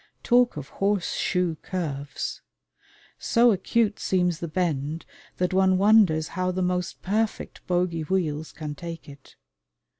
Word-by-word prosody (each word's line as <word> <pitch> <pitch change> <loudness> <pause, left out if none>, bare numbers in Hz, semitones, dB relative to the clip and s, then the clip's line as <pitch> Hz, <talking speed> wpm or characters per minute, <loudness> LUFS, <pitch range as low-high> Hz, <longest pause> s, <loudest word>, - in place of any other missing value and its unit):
Talk 245 -5 +3
of 145 -2 -7
horse 200 -2 0
shoe 180 -3 0
curves! 145 -7 -4 0.8
So 235 0 +4
acute 210 +2 +1
seems 180 -3 +1
the 170 - -4
bend 155 -2 -2 0.3
that 180 0 0
one 190 0 +4
wonders 195 -6 +4
how 185 -1 -1
the 185 0 -1
most 180 0 -2
perfect 215 +3 -2
bogey 175 -2 0
wheels 155 -3 -1
can 150 -2 -6
take 165 +2 -8
it. 140 -1 -14
180 Hz, 130 wpm, -25 LUFS, 160-190 Hz, 0.8 s, So